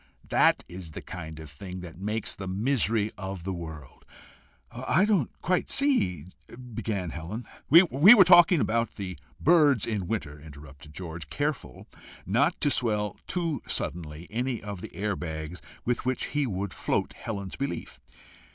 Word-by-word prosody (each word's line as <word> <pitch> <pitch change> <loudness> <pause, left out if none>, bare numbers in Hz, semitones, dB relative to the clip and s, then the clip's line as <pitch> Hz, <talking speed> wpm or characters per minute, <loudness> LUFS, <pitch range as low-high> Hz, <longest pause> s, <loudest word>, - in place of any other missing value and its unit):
That - - +4
is 90 -3 -9
the - - -6
kind 80 -3 -8
of 80 - -9
thing 90 +6 -8
that 85 -1 -10
makes 105 +2 -3
the 100 - -7
misery 110 +1 +1
of 95 -3 -5
the 95 +1 -3
world!" 80 -5 -9 0.7
"I 130 +11 +2
don't 200 - +2
quite 180 +1 +1
see 95 - +1 0.3
" 125 -1 -11
began 100 -6 -3
Helen. 90 +10 -6 0.2
"We 170 +4 +9 0.3
were 200 - +9
talking 175 -1 +7
about 115 -1 0
the 90 -6 -6 0.2
birds 150 - +5
in 105 -6 -2
winter," 75 -9 -4
interrupted 75 -1 -13
George, 85 -4 -7
careful 145 0 -3 0.4
not 140 - +2
to 145 - +3
swell 105 -6 0
too 165 -7 -1
suddenly 80 -1 -4
any 120 +1 -1
of 100 -3 -6
the - - -9
air 105 0 -1
bags 80 0 -6 0.2
with 120 0 0
which 130 0 -1
he 145 -2 +1
would 100 -2 -3
float - - -1
Helen's 100 -4 -5
belief. 140 +1 -5
100 Hz, 155 wpm, -27 LUFS, 85-130 Hz, 0.7 s, We